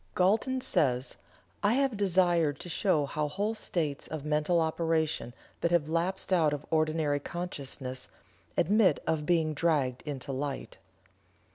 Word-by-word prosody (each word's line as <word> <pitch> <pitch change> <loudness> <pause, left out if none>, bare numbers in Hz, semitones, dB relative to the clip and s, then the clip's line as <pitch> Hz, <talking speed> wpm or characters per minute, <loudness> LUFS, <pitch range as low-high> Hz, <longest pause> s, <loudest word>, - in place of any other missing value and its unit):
Galton 220 +8 +2
says: 130 - +1 0.5
"I 205 +2 +3
have 270 -2 +1
desired 175 -6 +2
to 175 - -7
show 165 -5 +2
how 150 +2 -2
whole 205 +8 -1
states 160 -9 -2
of 155 -2 -6
mental 150 +3 +2
operation 160 -4 0 0.3
that 170 - +1
have 170 -3 +2
lapsed 180 +4 -1
out 160 -5 +3
of 145 0 -5
ordinary 155 -2 +1
consciousness, 140 -6 -5 0.5
admit 200 -4 +4
of 155 -2 -1
being 165 -3 +2
dragged 140 -5 +1
into 140 -2 -5
light." 135 +1 -4
160 Hz, 135 wpm, -30 LUFS, 145-180 Hz, 0.5 s, admit